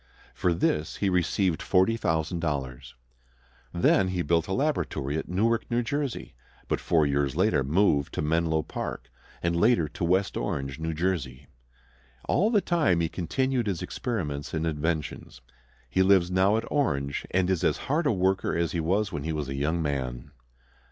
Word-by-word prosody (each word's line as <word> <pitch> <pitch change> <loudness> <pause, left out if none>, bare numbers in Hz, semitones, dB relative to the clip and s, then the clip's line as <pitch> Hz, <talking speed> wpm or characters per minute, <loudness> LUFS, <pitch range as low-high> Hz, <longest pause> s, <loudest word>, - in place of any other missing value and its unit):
For 90 - 0
this 80 -2 0
he 100 - 0
received 90 -1 +1
$40,000. 80 - 0 0.8
Then 90 +2 +3
he 90 -1 -1
built 85 -1 +1
a - - -5
laboratory 95 - -1
at 80 - -4
Newark, 110 +6 +1
New 120 0 +1
Jersey; 140 +1 -3 0.3
but - - 0
four 80 -3 +2
years 70 -1 0
later 90 -6 +2
moved 75 -1 +2
to - - -1
Menlo 80 0 +1
Park, - - -6 0.3
and 85 0 +1
later 85 -3 +3
to - - -6
West 95 +3 +1
Orange, 70 +1 -3
New 80 0 -3
Jersey. 75 -7 -2 0.8
All 205 +5 +3
the 215 -3 +3
time 160 - +2
he 85 -1 0
continued 125 - -1
his 95 -4 -2
experiments 70 +1 -3
and 80 +1 -1
inventions. 80 0 -3 0.5
He 65 +10 +1
lives 95 -2 +4
now 95 +3 +3
at 115 - -2
Orange, 70 - -1
and 95 0 +1
is 95 -2 0
as - - +2
hard 150 +3 +1
a - - +3
worker 95 -1 +1
as 85 -2 0
he 85 - -2
was 95 +6 0
when 75 -5 -4
a 75 -4 -3
young 80 +5 -1
man. 65 -2 -3
85 Hz, 160 wpm, -27 LUFS, 75-95 Hz, 0.8 s, lives